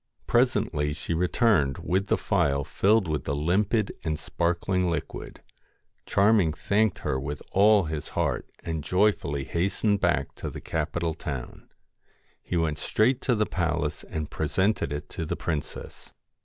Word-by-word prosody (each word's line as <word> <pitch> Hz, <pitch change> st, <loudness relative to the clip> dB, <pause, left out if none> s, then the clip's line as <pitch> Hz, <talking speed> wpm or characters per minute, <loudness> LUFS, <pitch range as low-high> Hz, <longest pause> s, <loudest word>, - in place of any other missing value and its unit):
Presently 105 Hz, -, +1 dB
she 80 Hz, +2 st, -4 dB
returned, 85 Hz, -, +2 dB
with 95 Hz, +3 st, -1 dB
the -, -, +2 dB
phial 70 Hz, 0 st, +1 dB
filled 100 Hz, +6 st, +2 dB
with 75 Hz, -4 st, -2 dB
the 70 Hz, -, -1 dB
limpid 95 Hz, +7 st, +1 dB
and 80 Hz, -2 st, -1 dB
sparkling 90 Hz, +3 st, 0 dB
liquid. 85 Hz, -3 st, -5 dB, 0.6 s
Charming 100 Hz, -5 st, +4 dB
thanked 100 Hz, +4 st, +1 dB
her 65 Hz, -, 0 dB
with 70 Hz, +2 st, -5 dB
all 105 Hz, +1 st, +5 dB
his 80 Hz, -3 st, -4 dB
heart, -, -, 0 dB
and 80 Hz, -2 st, -3 dB
joyfully 90 Hz, -7 st, +1 dB
hastened 100 Hz, +6 st, 0 dB
back -, -, +1 dB
to -, -, -4 dB
the -, -, -7 dB
capital 80 Hz, +1 st, -2 dB
town. 70 Hz, -5 st, -7 dB, 0.7 s
He 90 Hz, -, -2 dB
went 80 Hz, -2 st, 0 dB
straight 125 Hz, +4 st, +2 dB
to 125 Hz, -, +2 dB
the 105 Hz, 0 st, +2 dB
palace 80 Hz, -5 st, -1 dB
and 75 Hz, -1 st, -4 dB
presented 95 Hz, +2 st, 0 dB
it 75 Hz, 0 st, -4 dB
to -, -, -5 dB
the 80 Hz, -, -2 dB
princess. 80 Hz, -3 st, -5 dB
85 Hz, 145 wpm, -27 LUFS, 75-100 Hz, 0.7 s, all